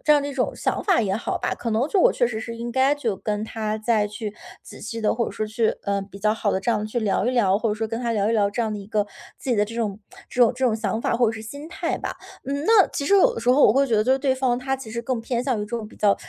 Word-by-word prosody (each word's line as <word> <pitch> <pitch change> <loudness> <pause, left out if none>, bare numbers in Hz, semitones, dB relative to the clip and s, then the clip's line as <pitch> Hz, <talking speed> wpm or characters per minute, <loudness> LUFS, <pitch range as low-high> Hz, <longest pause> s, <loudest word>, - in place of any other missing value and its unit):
这 300 - +6
样 295 - +5
的 285 - -3
一 280 - -6
种 255 - 0
想 - - -2
法 380 -4 +4
也 195 -4 0
好 230 - -3
吧， - - -1
可 230 - -4
能 220 +3 +1
就 305 - -6
是 - - +2
我 - - +5
确 245 - +2
实 225 -2 -4
是 230 +1 -6
应 235 0 -4
该 265 +3 +3
就 230 -9 -2
跟 210 +1 -2
他 220 -1 -3
再 215 -1 +1
去 210 0 -6 0.3
仔 - - -12
细 230 - -5
地， 215 - +2
或 235 0 0
者 - - -4
说 215 - -3
去， 220 +1 0
呃， 200 0 0
比 200 0 -11
较 215 +2 +2
好 210 -2 0
地 190 - 0
这 215 - 0
样 215 -1 0
去 240 +3 -2
聊 205 -1 +1
一 250 - +2
聊， 205 -6 +3
或 225 -2 0
者 - - 0
说 220 0 -3
跟 230 +1 -3
他 235 -2 -1
聊 205 -1 +1
一 230 - +1
聊 205 -3 +2
这 235 - -3
样 220 -2 0
的 210 - -4
一 195 - -9
个， 210 -1 0 0.3
自 - - -9
己 240 - +2
的 205 - +3
这 230 +2 -9
种 215 -4 -2 0.3
这 250 - +2
种 235 - +5
这 265 - -7
种 220 - +1
想 220 0 -2
法 235 - 0
或 245 - +3
者 225 - +1
是 220 - -7
心 285 +8 -8
态 - - -2
吧。 - - -5 0.3
嗯， 280 +2 -3
那 440 -4 +6
其 280 - -3
实 400 - +4
有 380 - +5
的 - - -5
时 235 - -2
候 275 +3 +5
我 210 - +5
会 275 +2 +3
觉 225 -3 +1
得 215 - +2
就 260 - +3
是 265 - +2
对 265 -1 +1
方 255 -2 +1
他 270 +1 -1
其 260 -4 -9
实 235 +1 -3
更 245 0 -2
偏 240 0 -1
向 255 -3 0
于 - - -2
这 210 +3 -6
种 220 -2 -6
比 - - -17
较 205 -1 +3
230 Hz, 370 characters per minute, -23 LUFS, 215-255 Hz, 0.3 s, 这